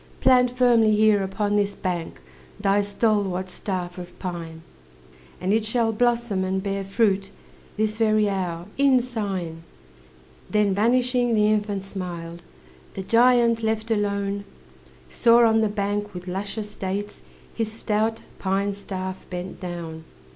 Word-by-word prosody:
Plant 250 -1 +5
firmly 230 -4 +5
here 215 -1 +4
upon 205 +2 -1
this 205 -1 0
bank 175 - -4 0.4
Thy 200 +1 +3
stalwart 200 -3 0
staff 180 -2 -4
of 175 0 -10
pine, 165 -3 -6 0.8
And 185 +2 0
it 220 0 +2
shall 225 +1 +1
blossom 235 -3 +1
and 190 0 -1
bear 195 -1 -2
fruit, 195 -1 +1 0.5
This 215 0 0
very 215 -2 +3
hour, 180 -4 -2
in 275 -2 +5
sign." 195 -9 -4 0.9
Then, 210 -2 +2
vanishing, 245 +3 +2
the 210 -1 +4
infant 205 -2 -1
smiled. 175 -3 -6 0.5
The 190 - -4
giant, 235 +1 +4
left 220 0 -1
alone, 200 -1 -1 0.6
Saw 235 - +5
on 225 0 +3
the 220 - +2
bank, 205 -1 -2
with 180 +1 -7
luscious 205 +3 -4
dates, 200 +2 -4 0.3
His 225 -2 -2
stout 220 0 -1 0.2
pine 195 +1 0
staff 190 -1 -6
bent 180 0 -6
down. 170 -3 -6
205 Hz, 135 wpm, -24 LUFS, 190-220 Hz, 0.9 s, Plant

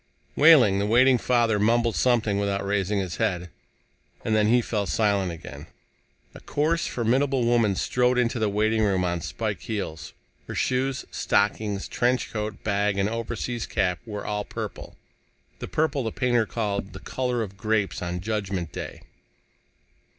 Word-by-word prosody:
Wehling, 135 -11 +6
the 100 - 0
waiting 125 +3 +5
father, 115 -4 +2
mumbled 115 +2 +2
something 115 -5 +2
without 100 -1 -1
raising 100 0 0
his 95 -3 -3
head. 90 -6 -1 0.7
And 110 - +1
then 105 -1 +3
he 120 +3 +5
fell 105 -4 -2
silent 100 0 +1
again. 80 -1 -9 0.7
A - - -11
coarse, 160 +3 0
formidable 130 +2 +1
woman 115 -4 +3
strode 125 +5 +1
into 120 -1 +1
the 110 -1 +1
waiting 110 +2 +1
room 95 -3 +2
on 85 -1 -1
spike 105 +1 -3
heels. 80 -8 -5 0.3
Her - - -6
shoes, 130 +1 0
stockings, 100 0 0
trench 125 +1 0
coat, 105 -1 -4
bag 100 -1 0
and 100 0 +2
overseas 115 +1 -3
cap 90 -5 0
were 105 -2 -5
all 105 0 -2
purple, - - -7 0.6
the - - -5
purple 150 -3 0
the 110 - -2
painter 120 -2 +1
called 100 -4 -3
"the 95 - -8
color 125 +1 -2
of 100 -2 -8
grapes 105 0 -1
on 90 0 -3
Judgment 100 -5 -3
Day." - - -7
110 Hz, 155 wpm, -25 LUFS, 100-120 Hz, 0.7 s, Wehling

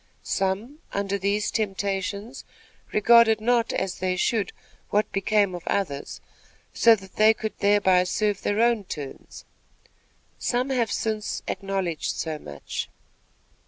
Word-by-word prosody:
Some, 205 +10 -2
under 200 0 -1
these 200 +2 0
temptations, 200 +3 -2 0.5
regarded 225 0 +5
not 235 +1 +2
as 190 - -2
they 185 0 0
should 210 +2 0 0.4
what 210 +1 +1
became 200 0 +2
of 175 - -5
others, 145 -9 -2 0.5
so 230 -1 +6
that 190 -2 -14
they 220 +1 +6
could 220 0 -4
thereby 200 -3 +4
serve 205 +2 0
their 205 +2 0
own 235 -3 +2
turns. 145 -6 -8 0.9
Some 250 +2 0
have 235 -5 +1
since 215 -1 -2
acknowledged 190 -4 -2
so 155 -2 -3
much. 70 - -6
205 Hz, 125 wpm, -25 LUFS, 190-220 Hz, 0.9 s, so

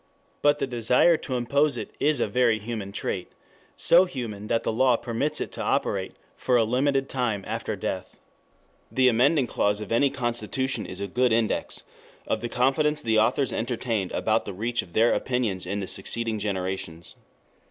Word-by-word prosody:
But 145 0 +4
the - - -1
desire 125 +6 +3
to 135 -4 -4
impose 140 +3 +1
it - - -6
is 150 -2 +2
a - - +1
very 125 -3 +2
human 110 -2 -5
trait, 95 -2 -4 0.4
so 175 +2 +5
human 115 - -6
that 115 +1 0
the - - -1
law 125 +2 +4
permits 120 +5 -2
it - - -4
to - - -6
operate - - -1 0.2
for 125 - 0
a 115 - +4
limited 135 +4 +1
time 120 -8 -1
after - - -3
death. - - -5 0.7
The 130 -1 +3
amending 130 +5 +3
clause 105 -3 0
of 105 -1 -7
any 135 +5 +3
constitution 125 +1 -1
is 95 - -8
a 100 - -2
good 125 +5 +1
index 115 -1 0 0.4
of 110 - -1
the 120 - -3
confidence 145 +5 +1
the 110 -1 +3
authors 125 +5 +1
entertained 115 -4 -2
about 110 +1 +1
the 100 - -5
reach 115 +5 -1
of 85 - -15
their 115 +2 +4
opinions 115 -8 -1
in 100 +2 -2
the 95 - -4
succeeding 110 +3 -2
generations. 95 -4 -4
120 Hz, 175 wpm, -26 LUFS, 105-130 Hz, 0.7 s, so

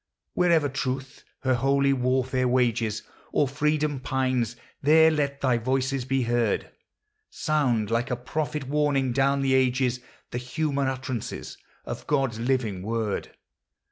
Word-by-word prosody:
Wherever 170 -4 +3
Truth 135 0 -4 0.2
her 130 -1 +2
holy 140 +2 +3
warfare 130 0 +1
wages, 115 -3 +1 0.3
Or 145 - +2
freedom 150 +1 0
pines, 130 -3 0 0.3
there 160 +3 +6
let 140 -2 -1
thy 125 -3 +2
voice 130 +2 0
be 135 0 +1
heard; 120 0 0 0.6
Sound 125 -9 0
like 115 +1 0
a 125 - 0
prophet 145 +3 -3
warning 140 -2 +1
down 135 +2 +2
the 135 -1 +2
ages 130 -1 +2 0.3
The 125 - -2
human 140 +2 -1
utterance 130 -3 -4 0.3
of - - -6
God's 135 -6 0
living 115 -6 0
word. 110 0 -3
130 Hz, 130 wpm, -26 LUFS, 125-140 Hz, 0.6 s, there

